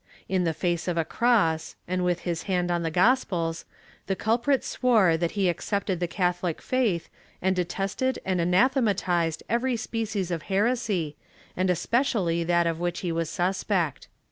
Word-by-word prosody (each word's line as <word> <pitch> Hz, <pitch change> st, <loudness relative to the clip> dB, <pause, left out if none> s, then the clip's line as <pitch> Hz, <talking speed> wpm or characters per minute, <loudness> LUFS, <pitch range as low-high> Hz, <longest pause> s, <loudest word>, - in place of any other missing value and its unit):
In 185 Hz, -1 st, +1 dB
the 165 Hz, -, +1 dB
face 175 Hz, 0 st, -1 dB
of 175 Hz, -1 st, -1 dB
a 165 Hz, -, +1 dB
cross 180 Hz, -7 st, +1 dB
and 180 Hz, 0 st, -1 dB
with 180 Hz, -1 st, 0 dB
his 170 Hz, -2 st, -2 dB
hand 180 Hz, -1 st, +1 dB
on 175 Hz, -1 st, 0 dB
the 165 Hz, -, -1 dB
gospels, 175 Hz, -4 st, +1 dB, 0.4 s
the 195 Hz, -, 0 dB
culprit 240 Hz, +7 st, +1 dB
swore 220 Hz, -10 st, +3 dB
that 165 Hz, +1 st, -1 dB
he 195 Hz, -2 st, +3 dB
accepted 190 Hz, +1 st, -1 dB
the 175 Hz, -, 0 dB
Catholic 175 Hz, -1 st, -1 dB
faith 230 Hz, -10 st, 0 dB, 0.3 s
and 190 Hz, +1 st, +1 dB
detested 195 Hz, +8 st, -1 dB
and 185 Hz, -2 st, +1 dB
anathematized 180 Hz, -, +2 dB
every 240 Hz, +2 st, 0 dB
species 220 Hz, -4 st, -3 dB
of 165 Hz, -2 st, -2 dB
heresy, 195 Hz, -7 st, 0 dB, 0.4 s
and 185 Hz, +1 st, +1 dB
especially 180 Hz, -, +1 dB
that 170 Hz, 0 st, +2 dB
of 165 Hz, -1 st, -1 dB
which 175 Hz, 0 st, -2 dB
he 175 Hz, -, -2 dB
was 165 Hz, -1 st, -1 dB
suspect. 180 Hz, -3 st, -1 dB
180 Hz, 160 wpm, -26 LUFS, 170-215 Hz, 0.4 s, swore